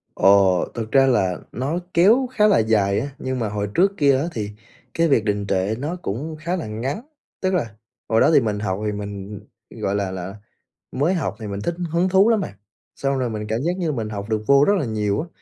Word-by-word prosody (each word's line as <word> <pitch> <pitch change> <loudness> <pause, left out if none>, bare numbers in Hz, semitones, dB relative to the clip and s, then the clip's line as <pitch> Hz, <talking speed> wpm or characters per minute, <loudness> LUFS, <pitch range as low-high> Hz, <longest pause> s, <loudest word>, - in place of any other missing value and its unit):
Ồ, 95 -2 +4
thực 110 -2 -5
ra 135 -1 +6
là 95 -8 +1
nó 140 +8 -2 0.2
kéo 215 +10 +5
khá 210 -1 +4
là 205 - +4
dài 105 -2 +2
á, 140 +4 -4
nhưng 130 0 -3
mà 115 -3 -1
hồi 105 -1 -3
trước 195 +3 +3
kia 140 -3 +4
á, 140 - -1
thì 105 -2 -4 0.4
cái 165 0 +2
việc 115 -7 +3
đình 100 -1 -1
trệ 95 +3 0
nó 155 +6 -3
cũng 155 - -5
khá 175 +3 -2
là 165 - -4
ngắn. 125 - -4 0.4
Tức 190 0 +1
là 115 - -1 0.3
hồi 110 0 +3
đó - - +5
thì - - +7
mình 105 -3 -1
học 95 -1 -2
thì 105 - 0
mình 100 0 -6 0.3
gọi 105 -3 -3
là 100 -2 -1
là, 95 +2 -6 0.6
mới 145 +8 +1
học 170 -6 -2
thì 110 - -6
mình 100 0 -4
thích 170 +9 -2 0.2
hứng 175 +3 +2
thú 195 +4 +5
lắm 225 -3 +3
bạn. - - -5 0.4
Xong 135 0 -1
rồi 125 -2 -1
mình 105 -1 -5
cảm 110 +1 0
giác 175 +5 -1
như 175 -3 -1
là 150 - -2
mình 110 -3 -3
học 100 0 -6
được 110 -1 -1
vô 140 0 +6
rất 205 - +5
là 150 - -1
nhiều 105 -1 -1
á, 170 - -7
115 Hz, 240 wpm, -22 LUFS, 105-160 Hz, 0.6 s, thì